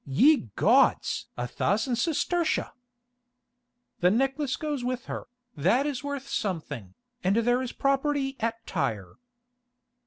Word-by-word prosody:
Ye 230 - +4
gods! - - +3
a 120 - -2
thousand 220 - 0
sestertia!" 335 +5 0 1.3
"The 180 - +4
necklace 270 +5 +1
goes 295 -5 -3
with 250 0 -2
her, - - -6 0.3
that 190 - +2
is 290 -2 -3
worth 285 -1 -4
something, 145 - -4 0.3
and 190 +2 +2
there 245 +2 +2
is 255 - -4
property 275 0 0
at 230 0 -2
Tyre." 100 -4 -3
250 Hz, 120 wpm, -27 LUFS, 190-280 Hz, 1.3 s, Ye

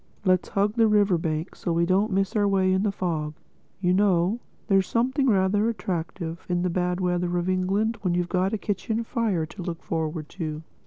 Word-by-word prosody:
Let's 185 -1 +2
hug 200 +1 +1
the 230 -1 +4
river 205 -4 +3
bank 160 +2 -2
so 175 - -3
we 170 +1 +2
don't 195 +4 +2
miss 195 +1 0
our 205 -1 +3
way 190 -1 +3
in 190 - +2
the 205 0 +1
fog. 160 -6 -2 0.5
You 180 -1 +3
know, 190 +2 +2 0.3
there's 195 -3 +3
something 260 +4 +1
rather 205 +2 +3
attractive 170 -5 -4
in 175 0 +1
the 180 - 0
bad 180 0 0
weather 180 -1 0
of 175 +1 -1
England—when 195 +1 0
you've 175 0 0
got 185 +2 +1
a 220 - 0
kitchen 215 +3 -2
fire 220 -9 0
to 185 +5 -10
look 170 -2 -5
forward 160 -1 -3
to.... 155 -4 -5
185 Hz, 195 wpm, -25 LUFS, 175-205 Hz, 0.5 s, the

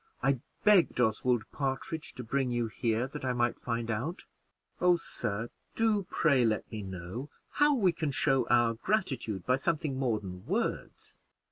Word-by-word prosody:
I 135 -1 +3 0.2
begged 205 - +5
Oswald 120 0 +2
Partridge 140 +3 -3
to 125 - -6
bring 130 +3 0
you 120 -1 0
here 115 +2 0
that 135 - -7
I 130 -1 0
might 120 -1 0
find 115 -1 -2
out. 135 - -3 0.5
Oh, 180 0 +5
sir, 115 -9 -3 0.3
do, 215 -4 +2
pray, 140 -6 +3
let 110 -2 0
me 110 - -4
know 95 +8 -6 0.2
how 295 0 +4
we 195 -8 +3
can 160 -3 -2
show 135 0 +2
our 120 -1 +4
gratitude 125 - -1
by 130 +1 +3
something 150 -2 -1
more 120 -5 +1
than 90 -2 -8
words." 220 +6 -3
125 Hz, 160 wpm, -30 LUFS, 115-160 Hz, 0.5 s, begged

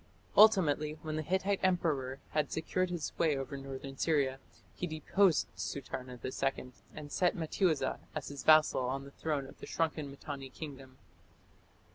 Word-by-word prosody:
Ultimately, 165 -8 +6
when 155 -1 -3
the 155 - -1
Hittite 190 +5 0
emperor 150 -8 +1
had 150 -2 0
secured 185 +3 0
his 175 -3 -3
sway 155 -3 +1
over 135 +1 -4
northern 135 0 -7
Syria, 140 -5 +1 0.3
he 180 - -3
deposed 165 +2 +3
Sutarna 125 +5 -5
II 130 -1 -2 0.2
and 145 -1 -8
set 180 -1 +2
Mattiuza 160 -4 +1 0.2
as 155 - -4
his 145 -1 -6
vassal 155 -3 +6
on 135 +2 -2
the 140 - -11
throne 145 -2 -2
of 135 - -13
the - - -8
shrunken 155 -3 -1
Mitanni 140 -1 -7
kingdom. 135 -3 -9
150 Hz, 150 wpm, -33 LUFS, 135-165 Hz, 0.3 s, Ultimately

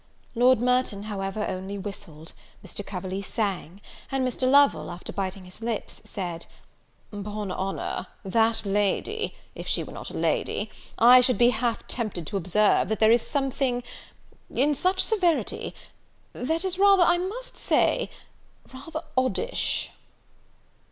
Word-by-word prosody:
Lord 250 0 +5
Merton, 250 -4 +1
however, 205 0 -3
only 190 +2 -4
whistled; 170 -6 -8 0.3
Mr. 205 - -5
Coverley 190 0 -4
sang; 195 -3 -3 0.3
and 265 -1 +1
Mr. 255 +1 0
Lovel, 280 +1 +5
after 175 0 -7
biting 190 -1 -4
his 180 +4 -12
lips, 230 -1 -3
said 175 -4 -5 0.6
"'Pon 205 -1 -5
honour, 190 +1 -3 0.2
that 225 +2 +2
lady 205 - 0 0.2
if - - -8
she - - +1
was - - -9
not - - -7
a - - -6
lady - - -1 0.3
I 250 +2 +8
should 250 0 +3
be 240 0 +5
half 230 0 -1
tempted 210 -8 -3
to 200 - -2
observe, 195 +3 +3
that 220 - -1
there 220 0 +6
is 235 0 +5
something, 270 -3 0 0.7
in 290 +4 +2
such 370 +6 +2
severity, 360 -7 0 0.6
that 320 +8 -1
is 375 0 -1
rather, 395 -2 +7
I 350 0 +4
must 445 +8 -5
say, - - +2 0.6
rather 310 +5 -6
oddish." 260 - 0
225 Hz, 140 wpm, -26 LUFS, 195-270 Hz, 0.7 s, I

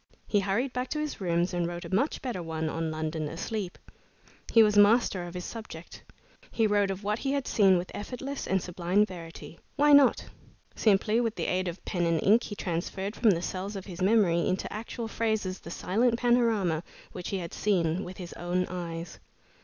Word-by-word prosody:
He 205 - +2
hurried 200 +7 -1
back 250 +1 -2
to 305 - -2
his 300 -7 -4
rooms 175 0 0
and 175 -1 0
wrote 175 0 -6
a - - -7
much 260 +11 0
better 240 -9 -3
one 160 -1 -3
on 165 0 -2
"London 155 0 -3
Asleep." 200 +3 -4 0.7
He 225 - +7
was 210 -1 +3
master 205 -2 +5
of 175 - -9
his 180 - -5
subject. 200 -7 -9 0.5
He 225 - +1
wrote 205 -2 +2
of 195 +1 -4
what 210 +2 -1
he 275 0 -1
had 280 -2 -1
seen 195 -4 +5
with 175 +1 -4
effortless 265 +6 -5
and 190 -1 +1
sublime 180 +3 +1
verity. 170 -3 -10 0.2
Why 290 +1 +5
not? 285 -3 +6 0.5
Simply 215 +2 +3
with 230 -2 -1
the - - -3
aid 185 0 0
of 175 +1 -6
pen 175 -2 0
and 165 -1 +2
ink 220 +4 +5
he 205 - -6
transferred 190 +3 -3
from 230 - +3
the 175 -3 +2
cells 195 +3 -4
of 195 -1 -6
his 180 -2 -8
memory 185 -5 +3
into 185 - -2
actual 225 +2 -5
phrases 220 -5 -1
the - - -10
silent 230 +7 +1
panorama 230 -9 +2 0.3
which 180 - -6
he 195 - -1
had 170 -3 -6
seen 180 -3 +1
with 180 +1 -8
his 175 -2 -7
own 180 +1 -1
eyes. 170 -2 -6
195 Hz, 200 wpm, -28 LUFS, 175-225 Hz, 0.7 s, He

